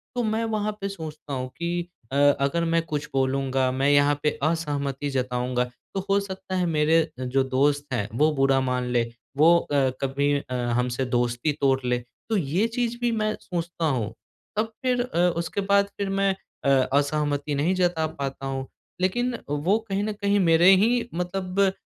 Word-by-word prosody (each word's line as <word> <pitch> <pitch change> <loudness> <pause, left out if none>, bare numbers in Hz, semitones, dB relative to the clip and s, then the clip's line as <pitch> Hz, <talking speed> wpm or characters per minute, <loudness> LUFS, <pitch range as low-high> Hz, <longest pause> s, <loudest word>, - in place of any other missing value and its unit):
तो 245 - 0
मैं 220 +1 0
वहाँ 215 -1 -1
पे 195 - -2
सोचता 155 -5 -7
हूँ 130 -1 -3
कि 170 +1 -2 0.2
अ - - -3 0.3
अगर 170 +5 +1
मैं 165 0 +2
कुछ 150 -2 -3
बोलूँगा 135 -1 +1
मैं 135 +2 +1
यहाँ 145 0 +5
पे 150 - +4
असहमति 145 -3 -1
जताऊँगा 125 -1 -1 0.3
तो 195 - -1
हो 200 0 +4
सकता 190 -1 -6
है 180 -1 +1
मेरे 160 0 +3 0.2
अ, - - -3
जो 130 +1 +1
दोस्त 145 +2 +1
हैं 105 -3 -1
वो 155 +1 +4
बुरा 135 0 +3
मान 125 -1 -1
ले 120 -1 +3 0.3
वो 170 +3 +6
अ, 140 -5 +1
कभी 140 +2 +1
अ, 130 - -8 0.2
हमसे 125 +1 0
दोस्ती 120 +3 0
तोड़ 135 -1 +3
ले। 125 0 +1 0.3
तो 220 - +2
ये 180 +7 +1
चीज़ 240 0 -2
भी 240 -1 +2
मैं 215 -1 0
सोचता 170 -1 -3
हूँ 125 -8 -1 0.4
तब 220 +1 0
फिर 250 -1 +1
अ, 245 -8 -4 0.2
उसके 170 +4 -2
बाद 200 0 +3
फिर 200 -1 -2
मैं 195 0 +1 0.3
अ - - +4 0.2
असहमति 145 0 0
नहीं 160 +7 +1
जता 175 -3 +1
पाता 135 -1 -4
हूँ। 135 0 -3 0.3
लेकिन 240 +6 0
वो 160 +9 +2
कहीं 195 +1 0
न 215 0 -2
कहीं 200 0 +1
मेरे 170 0 +5
ही 240 +1 +1
मतलब 180 +2 -3
अ, 195 -1 +4
155 Hz, 185 wpm, -25 LUFS, 135-195 Hz, 0.4 s, वो